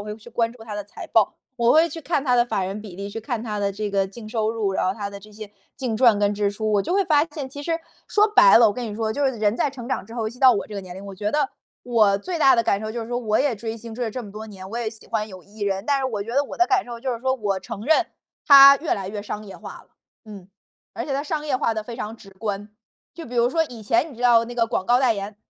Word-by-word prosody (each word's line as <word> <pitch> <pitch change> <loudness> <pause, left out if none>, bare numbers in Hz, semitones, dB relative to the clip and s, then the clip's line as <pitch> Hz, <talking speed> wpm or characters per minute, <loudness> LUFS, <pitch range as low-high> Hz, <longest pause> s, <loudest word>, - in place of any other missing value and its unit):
我 - - -7
会 210 - -5
去 225 +2 -15
关 230 0 0
注 230 -1 -14
它 215 -2 -7
的 205 - -4
财 205 - -10
报， - - +3 0.2
我 235 0 +3
会 325 +2 +5
去 325 - -7
看 305 -3 -1
它 250 -3 +3
的 240 -1 +4
法 195 -5 -1
人 195 +3 -4
比 205 -5 -10
例， 200 +1 -6
去 225 - -6
看 225 0 -4
它 215 -3 -4
的 200 -1 0
这 205 +1 -4
个 195 -1 +1
净 215 +3 -11
收 220 -1 -1
入， 215 -4 -1
然 190 - 0
后 185 - 0
它 200 -1 -4
的 200 0 -9
这 215 - -15
些， 210 0 -10 0.3
净 250 -4 -2
赚 225 -2 +5
跟 205 0 +2
支 205 0 0
出， 215 +1 -2
我 205 - +3
就 195 - -2
会 395 0 +3
发 300 -4 +4
现 295 -3 -6
其 285 +2 -8
实， 330 +2 -1 0.3
说 420 0 +4
白 - - +7
了 230 - +7
我 - - -1
跟 245 +2 -5
你 210 - -6
说， 220 0 -1
就 285 +4 0
是 265 - +1
人 215 -3 0
在 235 +4 +1
成 255 -3 -9
长 260 - -3
之 225 - -11
后， 235 - -2
尤 220 - -2
其 245 - -14
到 260 -1 +7
我 200 - -2
这 215 - -9
个 200 - -3
年 185 -2 -10
龄， 190 +2 -9
我 200 - -7
觉 210 +2 -2
得， 295 -2 +1 0.3
我 220 -5 +3
最 345 - -4
大 270 -4 +6
的 230 - +2
感 200 -2 +1
受 215 0 -5
就 235 0 -4
是 225 - -9
说 245 0 -1
我 220 -3 +1
也 270 -4 +1
追 225 +2 -5
星 230 0 -10
追 240 +2 -3
了 225 - -3
这 255 - -5
么 205 - -10
多 215 +2 -8
年， 190 -3 -10
我 230 - -4
也 235 -2 -2
喜 220 0 -14
欢 215 -2 -1
有 185 -4 -11
艺 210 +3 -17
人， 195 -1 -1
但 280 -1 +2
是 270 - -2
我 220 -6 -2
觉 230 +3 -7
得 280 +1 +3
我 - - -8
的 355 - +4
感 390 -1 +2
受 235 -1 -8
就 255 0 -2
是 235 - -4
说， 260 0 +1
我 205 -6 -1
承 195 - -8
认， 320 +4 +3 0.4
它 275 -1 +10
越 310 +3 -1
来 195 -2 -5
越 205 +1 -5
商 210 0 -6
业 195 - -10
化 - - -9
了， - - -29 0.4
嗯。 200 -4 -11 0.5
而 - - -2
且 280 - -4
它 275 - -1
商 300 0 -3
业 265 -4 0
化 230 - 0
得 215 - -3
非 235 +2 -8
常 225 -1 -6
直 195 -3 -15
观， 205 +1 -5 0.4
就 335 - -9
比 245 - -9
如 240 +1 +3
说 325 +3 +2
以 245 -7 -10
前 230 +9 +1
你 255 - -13
知 245 - -8
道 235 -2 +5
那 240 - -8
个 230 -1 +2
广 205 -5 -2
告 245 +1 +4
代 255 -3 +3
言 200 0 -6
225 Hz, 350 characters per minute, -23 LUFS, 205-255 Hz, 0.5 s, 它